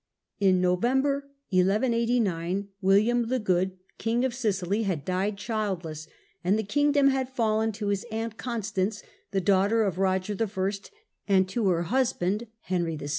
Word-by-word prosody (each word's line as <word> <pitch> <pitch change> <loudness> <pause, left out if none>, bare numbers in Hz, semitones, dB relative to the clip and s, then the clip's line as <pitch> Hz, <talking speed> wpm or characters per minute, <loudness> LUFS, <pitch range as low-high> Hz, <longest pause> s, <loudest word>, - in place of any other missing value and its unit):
In 190 -2 +4
November 265 +10 +1 0.2
1189 200 -2 +1
William 215 +5 +3
the 255 +2 +1
Good, 190 -3 0 0.2
King 235 +3 +1
of 260 - -1
Sicily, 205 -4 0
had 185 -9 -2
died 190 +3 -1
childless, 185 -8 -3 0.4
and 190 +4 +2
the 220 - -1
kingdom 285 +5 +3
had 265 -1 0
fallen 225 -3 +1
to 205 0 -3
his 200 -1 0
aunt 225 0 -3
Constance, 215 -4 -2 0.3
the 195 -1 0
daughter 200 +4 +3
of 190 -4 -1
Eoger 195 +1 -1
I., 425 - -33 0.3
and 190 -1 +4
to 215 +1 0
her 170 -1 +1
husband, 235 -2 0
Henry 175 -3 -1
VI. 145 -1 -6
205 Hz, 145 wpm, -27 LUFS, 185-230 Hz, 0.4 s, In